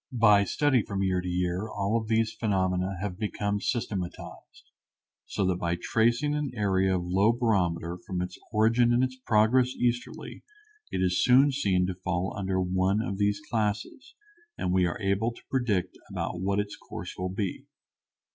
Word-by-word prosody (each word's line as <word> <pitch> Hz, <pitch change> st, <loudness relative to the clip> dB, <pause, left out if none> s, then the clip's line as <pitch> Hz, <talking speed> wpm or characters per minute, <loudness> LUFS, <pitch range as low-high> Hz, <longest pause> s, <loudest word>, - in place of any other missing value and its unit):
By 105 Hz, -5 st, +5 dB
study 135 Hz, +3 st, +2 dB
from 100 Hz, -2 st, -3 dB
year 95 Hz, -1 st, +1 dB
to 90 Hz, -, -6 dB
year 90 Hz, +3 st, -1 dB
all 100 Hz, +1 st, -1 dB
of 110 Hz, -1 st, -1 dB
these 110 Hz, 0 st, +1 dB
phenomena 95 Hz, -3 st, 0 dB
have 100 Hz, -2 st, -4 dB
become 105 Hz, -1 st, -2 dB
systematized, 100 Hz, -7 st, -4 dB, 0.6 s
so 100 Hz, -, -1 dB
that 90 Hz, -1 st, +1 dB
by 85 Hz, -1 st, -1 dB
tracing 120 Hz, +9 st, +1 dB
an 150 Hz, -1 st, -1 dB
area 95 Hz, -3 st, +2 dB
of 90 Hz, -, -4 dB
low 95 Hz, +5 st, +3 dB
barometer 90 Hz, -8 st, 0 dB
from 90 Hz, -2 st, -2 dB
its 90 Hz, 0 st, -4 dB, 0.2 s
origin 115 Hz, +2 st, +3 dB
in 120 Hz, +2 st, +3 dB
its 130 Hz, 0 st, -1 dB
progress 120 Hz, +3 st, +3 dB
easterly 120 Hz, 0 st, -2 dB, 0.5 s
it 95 Hz, -, 0 dB
is 90 Hz, 0 st, +2 dB
soon 130 Hz, +3 st, +6 dB
seen 95 Hz, -9 st, +1 dB
to 95 Hz, -, -2 dB
fall 90 Hz, 0 st, -2 dB
under 95 Hz, -2 st, -1 dB
one 95 Hz, +2 st, +1 dB
of 100 Hz, -3 st, -3 dB
these 105 Hz, 0 st, +1 dB
classes 110 Hz, -, -3 dB, 0.4 s
and 90 Hz, -, -1 dB
we 90 Hz, -1 st, +3 dB
are 85 Hz, -, -4 dB
able 100 Hz, +3 st, 0 dB
to -, -, -16 dB
predict 105 Hz, -9 st, 0 dB
about 90 Hz, -, -3 dB
what 100 Hz, +1 st, 0 dB
its 105 Hz, 0 st, -3 dB
course -, -, -8 dB
will 90 Hz, 0 st, -3 dB
be. 95 Hz, 0 st, -4 dB
100 Hz, 170 wpm, -28 LUFS, 95-115 Hz, 0.6 s, soon